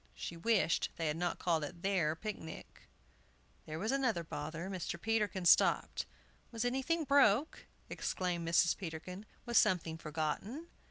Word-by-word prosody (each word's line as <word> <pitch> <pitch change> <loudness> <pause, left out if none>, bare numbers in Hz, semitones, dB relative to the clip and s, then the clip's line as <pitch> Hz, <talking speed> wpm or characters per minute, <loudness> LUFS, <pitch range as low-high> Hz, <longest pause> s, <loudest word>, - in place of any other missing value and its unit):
She 170 - -5
wished 180 -1 +2
they 165 - -3
had 150 - -1
not 175 0 -1
called 165 -3 +1
it 170 +4 -7
their 180 -6 +1
picnic. 165 -4 -8 0.8
There 155 0 -4
was 215 +8 -1
another 255 -10 +1
bother! 160 +3 -5
Mr. 185 -3 -4
Peterkin 210 -3 0
stopped. 170 - +4 0.4
"Was 230 0 -2
anything 270 +7 0
broke?" 280 -1 +3 0.2
exclaimed 175 -2 -2
Mrs. 170 +1 +4
Peterkin. 180 +3 -7 0.2
"Was 240 -1 +5
something 170 -5 +1
forgotten?" 165 - -3
180 Hz, 140 wpm, -34 LUFS, 165-225 Hz, 0.8 s, Was